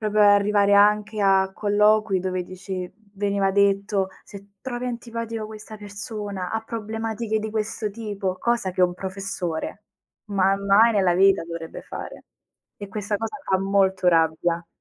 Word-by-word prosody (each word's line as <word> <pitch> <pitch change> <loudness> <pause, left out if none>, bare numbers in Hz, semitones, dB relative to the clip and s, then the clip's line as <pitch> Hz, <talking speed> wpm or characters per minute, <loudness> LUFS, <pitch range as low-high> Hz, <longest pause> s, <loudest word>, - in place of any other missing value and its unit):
Proprio 215 -1 +1
arrivare 205 0 +4
anche 210 +1 +3
a 190 -1 +4
colloqui 210 -1 +3
dove 185 -1 -2
dici 185 0 -6 0.2
veniva 200 -1 +1
detto: 200 0 +2 0.2
"Se 200 0 -13
trovi 250 -1 -5
antipatica 230 -2 -4
questa 215 0 -10
persona, 205 -2 -6
ha 225 - -1
problematiche 225 0 -3
di 220 0 -4
questo 215 0 -2
tipo.", 200 -4 -4
cosa 235 -5 0
che 185 - +1
un 180 0 +3
professore 190 0 -5 0.4
ma 195 -1 +2
mai 200 +4 +5
nella 190 -4 +3
vita 195 +1 +4
dovrebbe 165 -1 -7
fare. - - -8 0.5
E 205 - -8
questa 205 +1 -2
cosa 225 +6 -4
fa 190 - +3
molto 190 -1 +1
rabbia. 165 +1 +2
200 Hz, 140 wpm, -24 LUFS, 190-215 Hz, 0.5 s, mai